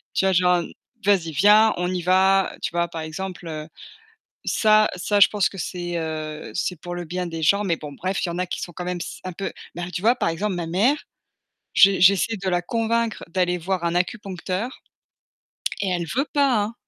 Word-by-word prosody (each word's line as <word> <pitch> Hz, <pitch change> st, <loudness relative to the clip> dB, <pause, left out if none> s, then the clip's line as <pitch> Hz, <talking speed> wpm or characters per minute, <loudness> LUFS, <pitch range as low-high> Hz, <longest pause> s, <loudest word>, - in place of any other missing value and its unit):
Tu -, -, +2 dB
vois 190 Hz, -, +4 dB
genre 180 Hz, 0 st, +4 dB
un 175 Hz, -, 0 dB
n: -, -, -10 dB, 0.3 s
«Vas-y, 180 Hz, -5 st, +3 dB
viens, 210 Hz, +7 st, +6 dB
on 180 Hz, +1 st, -1 dB
y 180 Hz, -, -2 dB
va», 190 Hz, +2 st, +3 dB
tu -, -, -1 dB
vois, 170 Hz, 0 st, 0 dB
par 165 Hz, -1 st, -6 dB
exemple, 180 Hz, +3 st, -6 dB
heu. 155 Hz, -1 st, -6 dB, 0.8 s
Ça, 215 Hz, -1 st, +4 dB
ça 205 Hz, +3 st, 0 dB
je -, -, +9 dB
pense 205 Hz, -3 st, +1 dB
que 195 Hz, -, -12 dB
c'est, 175 Hz, 0 st, -4 dB
heu, 155 Hz, -1 st, -5 dB
c'est 180 Hz, +1 st, -1 dB
pour 175 Hz, 0 st, -6 dB
le 175 Hz, 0 st, -5 dB
bien 180 Hz, +2 st, -3 dB
des 165 Hz, -1 st, -5 dB
gens. 200 Hz, +6 st, +3 dB
Mais 170 Hz, -4 st, +1 dB
bon 150 Hz, -2 st, -8 dB
bref, 185 Hz, +7 st, -2 dB
il -, -, -1 dB
y -, -, -2 dB
en 175 Hz, -, -5 dB
a 185 Hz, -, 0 dB
qui -, -, -4 dB
sont 175 Hz, -, -6 dB
quand 175 Hz, +2 st, -6 dB
même 180 Hz, 0 st, -3 dB
s -, -, -7 dB
un 185 Hz, -, -4 dB
peu, 195 Hz, +3 st, -4 dB, 0.2 s
ben 175 Hz, +1 st, -5 dB
tu 180 Hz, -, -4 dB
vois, 235 Hz, +3 st, +5 dB
par -, -, 0 dB
exemple 195 Hz, +4 st, -2 dB
ma 170 Hz, -2 st, -3 dB
mère, 210 Hz, -, +2 dB, 0.8 s
j'e 195 Hz, 0 st, +6 dB
j'essaie 200 Hz, +4 st, +4 dB
de 190 Hz, -1 st, -4 dB
la 175 Hz, 0 st, +1 dB
convaincre 230 Hz, +3 st, -1 dB
d'aller 180 Hz, 0 st, 0 dB
voir 180 Hz, 0 st, -2 dB
un 170 Hz, -, 0 dB
acupuncteur 190 Hz, +3 st, -3 dB, 1.0 s
et 195 Hz, -, 0 dB
elle 175 Hz, -2 st, -1 dB
veut 275 Hz, -, +2 dB
pas, 275 Hz, -7 st, +3 dB
hein. 215 Hz, +3 st, -4 dB
180 Hz, 225 wpm, -23 LUFS, 175-200 Hz, 1.0 s, je